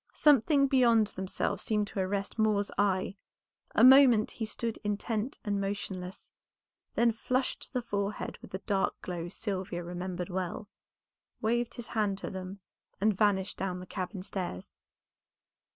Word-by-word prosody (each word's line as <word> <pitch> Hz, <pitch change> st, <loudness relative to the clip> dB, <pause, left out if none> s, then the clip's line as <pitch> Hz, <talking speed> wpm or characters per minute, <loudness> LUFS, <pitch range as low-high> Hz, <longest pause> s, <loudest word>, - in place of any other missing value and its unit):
Something 285 Hz, 0 st, +5 dB
beyond 245 Hz, -5 st, +5 dB
themselves 190 Hz, 0 st, -2 dB
seemed 210 Hz, -1 st, 0 dB
to -, -, -5 dB
arrest 195 Hz, +3 st, -2 dB
Moor's 210 Hz, -2 st, +2 dB
eye; 195 Hz, -1 st, +1 dB, 0.6 s
a -, -, +5 dB
moment 255 Hz, -4 st, +8 dB
he 225 Hz, -, -4 dB
stood 225 Hz, +1 st, -4 dB
intent 215 Hz, +4 st, -2 dB
and 205 Hz, -1 st, 0 dB
motionless, 195 Hz, -2 st, -5 dB, 0.6 s
then 235 Hz, 0 st, +4 dB
flushed 255 Hz, +3 st, -1 dB
to -, -, -11 dB
the 250 Hz, -2 st, -1 dB
forehead 205 Hz, -2 st, -3 dB
with -, -, -11 dB
the 190 Hz, -, -6 dB
dark 195 Hz, -2 st, 0 dB
glow 175 Hz, -1 st, -4 dB
Sylvia 190 Hz, -3 st, -4 dB
remembered 180 Hz, +1 st, -4 dB
well, 185 Hz, +2 st, -3 dB, 0.7 s
waved 240 Hz, +1 st, 0 dB
his 235 Hz, -1 st, -7 dB
hand 210 Hz, -3 st, 0 dB
to -, -, -6 dB
them 190 Hz, +1 st, -7 dB, 0.4 s
and 210 Hz, +1 st, +3 dB
vanished 200 Hz, -1 st, +1 dB
down 185 Hz, -1 st, -2 dB
the 180 Hz, -, -8 dB
cabin 185 Hz, 0 st, -5 dB
stairs. 180 Hz, -, -6 dB
205 Hz, 145 wpm, -30 LUFS, 190-225 Hz, 0.7 s, moment